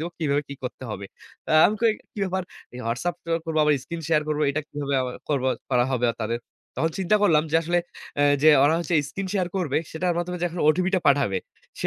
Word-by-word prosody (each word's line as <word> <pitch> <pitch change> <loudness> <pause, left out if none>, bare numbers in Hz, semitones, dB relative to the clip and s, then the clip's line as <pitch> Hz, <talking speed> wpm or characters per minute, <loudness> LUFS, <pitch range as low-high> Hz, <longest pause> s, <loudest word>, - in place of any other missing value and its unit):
দেবো 170 +2 -3
কিভাবে 145 -2 +1
কি 140 - -6
করতে 130 +1 -6
হবে।" 100 -1 -5 0.5
আ - - +4
আমি 215 - 0
কই 225 -2 +5 0.2
কি - - -10
ব্যাপার 190 0 -2 0.5
WhatsApp 170 +9 -2
ত - - -36 0.2
করব 160 -1 -3
আবার 150 - +4
স্ক্রিন 170 -1 -6
শেয়ার 155 -2 +3
করবো। 150 0 0
এটা 155 +2 -1
কিভাবে 140 -1 -3
আবার 125 -1 -4
করব 140 -3 0 0.3
করা 125 -1 +3
হবে 125 -1 +1 0.2
তাদের। 115 +2 -2 0.4
তখন 160 +4 +1
চিন্তা 190 +3 +3
করলাম 160 -7 +5
যে 160 - +4
আসলে 175 +2 +1 0.4
আ - - +5 0.2
যে 155 - +7 0.2
ওরা 155 +3 +4
হচ্ছে 175 0 -2
স্ক্রিন 195 -1 -5
শেয়ার 185 -4 0
করবে 165 -7 0
সেটার 175 +2 -1
মাধ্যমে 180 +1 -3
যে 175 - 0
এখন 170 0 -6
ওটিপিটা 185 +4 +2
পাঠাবে। 135 -9 +3 0.4
সে - - 0
160 Hz, 220 wpm, -24 LUFS, 140-175 Hz, 0.5 s, যে